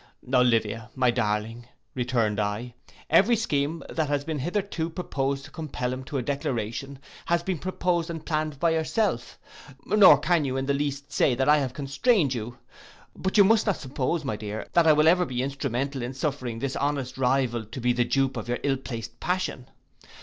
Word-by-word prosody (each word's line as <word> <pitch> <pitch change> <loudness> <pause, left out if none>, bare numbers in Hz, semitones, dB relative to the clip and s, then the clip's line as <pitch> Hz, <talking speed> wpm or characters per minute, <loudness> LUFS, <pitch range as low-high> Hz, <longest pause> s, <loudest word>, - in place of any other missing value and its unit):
'—'Olivia, 115 -3 +2
my 130 -2 +3
darling,' 115 0 -2 0.3
returned 120 -4 0
I, 105 +4 -2 0.3
'every 235 +5 +5
scheme 160 -7 -1
that 160 -2 -1
has 145 -1 0
been 155 -2 -3
hitherto 175 +1 -2
pursued 140 -5 -2
to - - -13
compel 130 -5 -4
him 130 +1 -6
to 140 - -4
a 130 - -1
declaration, 135 -1 -3 0.3
has 170 0 +1
been 180 -3 -2
proposed 180 -1 -1
and 165 -2 -6
planned 155 -2 -2
by 170 +1 +3
yourself, 160 - -1 0.5
nor 210 -3 +7
can 170 -3 +2
you 135 -1 -2
in 135 - -1
the 140 - +1
least 140 0 -3
say 130 - +3
that 130 +2 0
I 150 +1 +6
have 130 -3 -3
constrained 145 - +2
you. 120 +1 -5 0.6
But 190 +3 -1
you 200 - +9
must 220 +2 +3
not 200 - +2
suppose, 140 +3 -2
my 110 - -1
dear, 105 +1 -5
that 170 -1 +4
I 155 - +8
will 150 +1 +4
ever 180 +2 +5
be 125 -6 -2
instrumental 135 0 -2
in 125 +2 -5
suffering 130 -4 -3
his 135 -1 -2
honest 135 -3 -2
rival 125 -3 +1
to 115 +5 -8
be 125 0 +2
the 120 0 +2
dupe 135 +1 0
of 120 0 -5
your 120 - 0
ill 135 -1 +1
placed 115 -3 -7
passion. 180 -8 -2
135 Hz, 190 wpm, -26 LUFS, 125-160 Hz, 0.6 s, you